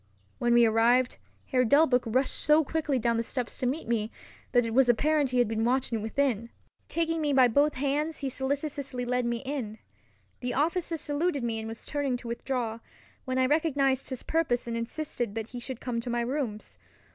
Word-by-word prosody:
When 240 Hz, 0 st, +3 dB
we 240 Hz, 0 st, +7 dB
arrived, 235 Hz, +3 st, +3 dB, 0.3 s
Herr 255 Hz, -2 st, +2 dB
Delbruck 265 Hz, 0 st, +4 dB
rushed 255 Hz, +4 st, +1 dB
so 300 Hz, +2 st, +4 dB
quickly 300 Hz, -2 st, -1 dB
down 235 Hz, -1 st, +1 dB
the -, -, +1 dB
steps 245 Hz, 0 st, -4 dB
to 255 Hz, -, 0 dB
meet 280 Hz, +3 st, -2 dB
me, 225 Hz, -1 st, -1 dB, 0.4 s
that 245 Hz, -1 st, +4 dB
it 225 Hz, -, -3 dB
was 260 Hz, 0 st, +4 dB
apparent 290 Hz, +4 st, +3 dB
he 250 Hz, -, -1 dB
had 245 Hz, -2 st, +4 dB
been 225 Hz, 0 st, -1 dB
watching 245 Hz, -2 st, +1 dB
within. 230 Hz, 0 st, 0 dB, 0.4 s
Taking 330 Hz, -1 st, 0 dB
me 295 Hz, -2 st, +1 dB
by 260 Hz, -2 st, +6 dB
both 285 Hz, +6 st, +2 dB
hands 290 Hz, +4 st, -1 dB
he 275 Hz, -, -3 dB
solicitously 275 Hz, -1 st, -3 dB
led 250 Hz, 0 st, 0 dB
me 235 Hz, +1 st, -2 dB
in. 255 Hz, -6 st, -4 dB, 0.6 s
The 245 Hz, -1 st, -3 dB
officer 335 Hz, +3 st, 0 dB
saluted 290 Hz, -1 st, -1 dB
me 230 Hz, -2 st, -1 dB
and 220 Hz, -, -5 dB
was 225 Hz, 0 st, -8 dB
turning 280 Hz, -4 st, -1 dB
to 240 Hz, -, -10 dB
withdraw, 235 Hz, -1 st, -3 dB, 0.5 s
when 260 Hz, -1 st, -2 dB
I 260 Hz, -, +4 dB
recognized 275 Hz, -2 st, +1 dB
his 260 Hz, -2 st, -5 dB
purpose 310 Hz, -7 st, 0 dB
and 235 Hz, -1 st, -3 dB
insisted 230 Hz, -2 st, -3 dB
that 225 Hz, 0 st, -4 dB
he 245 Hz, -, -6 dB
should 245 Hz, 0 st, -6 dB
come 235 Hz, -2 st, -3 dB
to 245 Hz, -, -6 dB
my 240 Hz, 0 st, 0 dB
rooms. 235 Hz, -4 st, -4 dB
255 Hz, 195 wpm, -28 LUFS, 235-285 Hz, 0.6 s, we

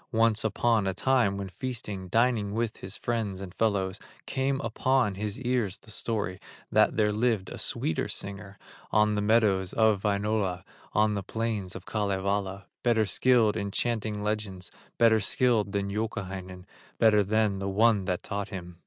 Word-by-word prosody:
Once 115 Hz, -1 st, +3 dB
upon 110 Hz, -1 st, +1 dB
a 95 Hz, -, -1 dB
time 115 Hz, -3 st, +2 dB
when 100 Hz, -1 st, -4 dB
feasting, 100 Hz, -1 st, -5 dB
Dining 110 Hz, -1 st, +1 dB
with 115 Hz, -1 st, -1 dB
his 95 Hz, +3 st, -7 dB
friends 110 Hz, -5 st, -2 dB
and 95 Hz, -2 st, -8 dB
fellows, 95 Hz, -3 st, 0 dB, 0.3 s
Came 135 Hz, 0 st, -1 dB
upon 120 Hz, -1 st, +1 dB
his 105 Hz, +1 st, -4 dB
ears 120 Hz, -7 st, 0 dB
the 110 Hz, -, -15 dB
story, 100 Hz, -4 st, -2 dB, 0.3 s
That -, -, +3 dB
there 105 Hz, -1 st, +3 dB
lived 110 Hz, -3 st, 0 dB
a -, -, -7 dB
sweeter 80 Hz, -, -1 dB
singer, 100 Hz, 0 st, -5 dB, 0.3 s
On 105 Hz, 0 st, +3 dB
the 105 Hz, -, 0 dB
meadows 105 Hz, -4 st, +2 dB
of 110 Hz, -3 st, +3 dB
Wainola, 100 Hz, -3 st, 0 dB, 0.3 s
On 105 Hz, 0 st, +3 dB
the 100 Hz, -, -2 dB
plains 105 Hz, -2 st, -3 dB
of -, -, -8 dB
Kalevala, 100 Hz, -1 st, -1 dB, 0.2 s
Better 115 Hz, -3 st, +3 dB
skilled 110 Hz, +2 st, +3 dB
in 100 Hz, -2 st, -2 dB
chanting 110 Hz, -1 st, -2 dB
legends, 105 Hz, -4 st, -3 dB, 0.3 s
Better 115 Hz, -1 st, +5 dB
skilled 110 Hz, 0 st, +2 dB
than 100 Hz, 0 st, -2 dB
Youkahainen, 95 Hz, -4 st, -4 dB, 0.3 s
Better 105 Hz, -2 st, +5 dB
than 105 Hz, -1 st, +1 dB
the 100 Hz, 0 st, -2 dB
one 105 Hz, 0 st, +3 dB
that 90 Hz, -2 st, -2 dB
taught 100 Hz, -1 st, -4 dB
him. 90 Hz, -3 st, -8 dB
105 Hz, 160 wpm, -28 LUFS, 95-115 Hz, 0.3 s, Better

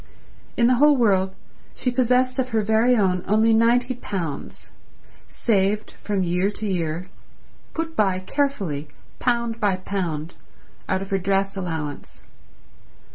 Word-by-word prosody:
In 235 Hz, -, +4 dB
the 250 Hz, +1 st, +4 dB
whole 295 Hz, +1 st, +5 dB
world 190 Hz, -5 st, +2 dB, 0.4 s
she 250 Hz, -, -1 dB
possessed 255 Hz, +1 st, +2 dB
of 255 Hz, -1 st, 0 dB
her 220 Hz, -3 st, +1 dB
very 220 Hz, +4 st, +3 dB
own 185 Hz, -4 st, +1 dB
only 220 Hz, +3 st, +4 dB
ninety 240 Hz, +3 st, +3 dB
pounds, 180 Hz, -, -6 dB, 0.6 s
saved 210 Hz, -1 st, 0 dB
from 200 Hz, -2 st, -2 dB
year 180 Hz, +2 st, +1 dB
to 215 Hz, +1 st, -6 dB
year, 170 Hz, -3 st, -2 dB, 0.7 s
put 325 Hz, 0 st, -3 dB
by 195 Hz, -3 st, +2 dB
carefully 185 Hz, -, -2 dB, 0.3 s
pound 235 Hz, -2 st, 0 dB
by 205 Hz, -3 st, +2 dB
pound, 175 Hz, -4 st, -3 dB, 0.6 s
out 190 Hz, -, 0 dB
of 195 Hz, -, -11 dB
her 195 Hz, -, +2 dB
dress 195 Hz, +1 st, 0 dB
allowance. 160 Hz, -6 st, -5 dB
205 Hz, 130 wpm, -23 LUFS, 185-240 Hz, 0.7 s, whole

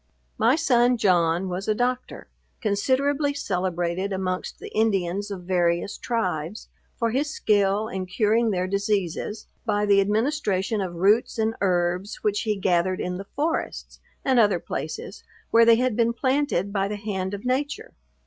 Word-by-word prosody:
My 230 Hz, +5 st, +4 dB
son 245 Hz, -6 st, +3 dB
John, 180 Hz, -3 st, +2 dB
was 185 Hz, +2 st, -4 dB
a 215 Hz, -, +2 dB
doctor, 250 Hz, +2 st, -2 dB, 0.3 s
considerably 275 Hz, +7 st, +1 dB
celebrated 180 Hz, -4 st, -2 dB
amongst 185 Hz, -1 st, -3 dB
the -, -, -9 dB
Indians 200 Hz, -2 st, 0 dB
of 190 Hz, -3 st, -6 dB
various 175 Hz, +1 st, 0 dB
tribes, 185 Hz, -5 st, -3 dB, 0.3 s
for 230 Hz, -2 st, 0 dB
his 280 Hz, +5 st, 0 dB
skill 205 Hz, -3 st, +1 dB
in 190 Hz, -3 st, -4 dB
curing 220 Hz, +4 st, +2 dB
their 185 Hz, -3 st, 0 dB
diseases, 200 Hz, +1 st, -2 dB, 0.2 s
by 205 Hz, 0 st, 0 dB
the 200 Hz, -1 st, +5 dB
administration 210 Hz, -2 st, 0 dB
of 180 Hz, -2 st, -4 dB
roots 205 Hz, +8 st, +2 dB
and 220 Hz, 0 st, +1 dB
herbs, 180 Hz, +1 st, 0 dB
which 205 Hz, -1 st, +1 dB
he 215 Hz, -2 st, 0 dB
gathered 185 Hz, -1 st, +1 dB
in 180 Hz, 0 st, -3 dB
the 195 Hz, -, -8 dB
forests, 315 Hz, +4 st, -2 dB, 0.3 s
and 260 Hz, -3 st, +4 dB
other 205 Hz, -5 st, +4 dB
places -, -, -6 dB, 0.3 s
where 230 Hz, 0 st, +6 dB
they 230 Hz, 0 st, +7 dB
had 250 Hz, -1 st, 0 dB
been 235 Hz, 0 st, +2 dB
planted 260 Hz, -7 st, 0 dB
by 195 Hz, -1 st, +1 dB
the 210 Hz, -, -3 dB
hand 200 Hz, -2 st, -3 dB
of 200 Hz, -, -10 dB
nature. 290 Hz, -, -2 dB
205 Hz, 155 wpm, -25 LUFS, 185-235 Hz, 0.3 s, they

